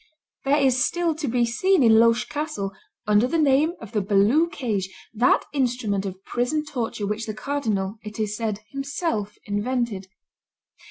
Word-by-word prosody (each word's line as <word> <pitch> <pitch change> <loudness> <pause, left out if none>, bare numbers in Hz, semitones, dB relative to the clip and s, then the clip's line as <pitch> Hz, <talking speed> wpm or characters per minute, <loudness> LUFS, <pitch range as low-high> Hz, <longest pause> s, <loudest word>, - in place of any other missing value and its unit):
There 280 +2 +3
is 260 -3 +3
still 345 -2 +1
to 310 -1 -4
be 240 0 +2
seen 360 +8 +2
in 225 -1 +6
Loches 230 +1 +4
castle, 295 -10 -3 0.3
under 210 +3 +4
the 330 - 0
name 300 +2 +3
of 225 - -10
the 210 - 0
Balue 210 - +3
cage, 210 -8 -2 0.2
that 235 +3 +3
instrument 235 -7 0
of 190 +1 -9
prison 255 +6 -1
torture 240 -7 -3
which 210 +3 -3
the 215 - -4
cardinal, 215 -7 -2
it 210 +1 -8
is 210 -1 -1
said, 215 -2 -3
himself 275 - -3
invented. 205 -1 -2
235 Hz, 160 wpm, -24 LUFS, 210-280 Hz, 0.3 s, in